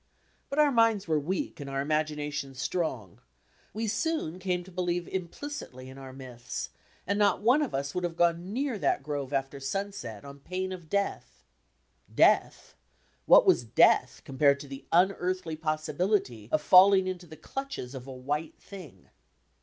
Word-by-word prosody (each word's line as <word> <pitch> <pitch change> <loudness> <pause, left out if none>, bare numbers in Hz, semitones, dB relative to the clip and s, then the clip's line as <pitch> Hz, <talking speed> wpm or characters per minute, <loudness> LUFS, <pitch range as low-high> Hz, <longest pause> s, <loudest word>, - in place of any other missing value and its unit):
But 275 - -4
our 300 -1 +5
minds 230 -5 +3
were 155 -2 +2
weak 170 +4 -3
and 140 -1 -6
our 135 0 -2
imaginadons 150 -2 -2
strong; 130 - -3 0.5
we 225 +2 -3
soon 260 - -1
came 180 -1 -1
to 190 - -14
believe 175 -1 -2
implicitly 180 - -6
in 135 +1 -11
our 135 -1 -9
myths, 125 -2 -7 0.3
and 200 +1 0
not 205 -1 +2
one 250 +7 +5
of 290 - -2
us 140 +1 -3
would 180 - -2
have 175 -1 -2
gone 175 +2 +1
near 255 -1 -2
that - - +1
grove 145 -2 -4
after 135 0 -2
sunset 135 - -5
on 140 0 -10
pain 185 +5 -4
of 175 -4 -8
death. 200 +2 -2 0.7
Death! - - +3 0.5
What - - +8
was 120 - +4
death 110 - +3
compared 140 +1 +3
to 145 - -9
the 135 0 -10
unearthly 180 -1 +1
possibilty 155 - -1
of 155 - +1
falling 190 +3 +7
into 180 -1 -5
the 155 0 -12
clutches 270 - -6
of 130 -1 -8
a - - -7
"white 145 +5 -4
thing"? 170 - -12
165 Hz, 160 wpm, -28 LUFS, 135-190 Hz, 0.7 s, What